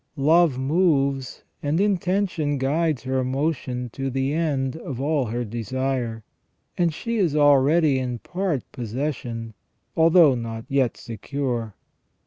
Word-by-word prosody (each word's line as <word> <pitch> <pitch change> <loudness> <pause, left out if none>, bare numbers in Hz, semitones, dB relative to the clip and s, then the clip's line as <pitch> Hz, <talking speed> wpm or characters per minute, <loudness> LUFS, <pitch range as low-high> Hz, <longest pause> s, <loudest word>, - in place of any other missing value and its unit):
Love 155 0 +4
moves 140 -3 +1 0.2
and 150 +3 0
intention 185 -6 0
guides 145 +2 0
her 130 0 0
motion 130 -2 -2
to 135 +2 -3
the 135 +2 -1
end 140 -5 0
of 135 -6 -6
all 145 -1 +1
her 120 +2 -3
desire, 120 0 -3 0.5
and 175 -2 +2
she 230 +9 -3
is 175 -8 +1
already 145 0 +4
in 125 -2 -3
part 175 - -2
possession, 120 -2 -4 0.4
although 165 -2 +6
not 115 -2 -5
yet 135 -4 +1
secure. 120 -2 -4
135 Hz, 120 wpm, -24 LUFS, 125-160 Hz, 0.5 s, although